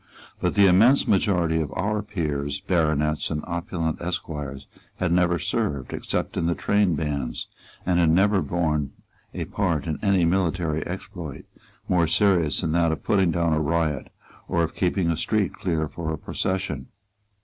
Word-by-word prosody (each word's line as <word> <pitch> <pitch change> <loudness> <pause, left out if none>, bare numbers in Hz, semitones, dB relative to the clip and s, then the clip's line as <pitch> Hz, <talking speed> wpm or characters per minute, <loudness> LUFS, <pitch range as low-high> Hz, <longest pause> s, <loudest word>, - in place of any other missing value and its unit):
But - - 0
the 100 - +6
immense 110 +9 +5
majority 90 -5 +2
of 75 - -4
our 105 +1 -1
peers, 75 -8 -3
baronets 75 -3 +1
and 75 -1 -3
opulent 85 -2 -3
esquires 75 -6 -4 0.3
had 90 -2 -1
never 85 0 +3
served 70 -4 -2
except - - -2
in 85 - 0
the 85 - +1
trainbands, 75 -10 0 0.4
and 90 -1 +2
had 85 -2 +4
never 95 +4 +4
borne 75 -5 -1 0.4
a - - -3
part 85 -8 -1
in 80 -2 -3
any 95 -4 +3
military 85 -3 0
exploit - - -7 0.4
more 85 -3 +3
serious 85 -5 +2
than 80 - -1
that 85 0 +3
of 80 - -4
putting 95 -4 +3
down 85 -1 +1
a 80 - +1
riot 80 -2 -1 0.4
or 85 - +1
of 80 - -2
keeping 90 -2 +1
a - - 0
street 100 +3 0
clear 80 -4 -1
for 80 +1 -4
a 80 - -3
procession. 80 -5 -3
85 Hz, 160 wpm, -24 LUFS, 75-95 Hz, 0.4 s, the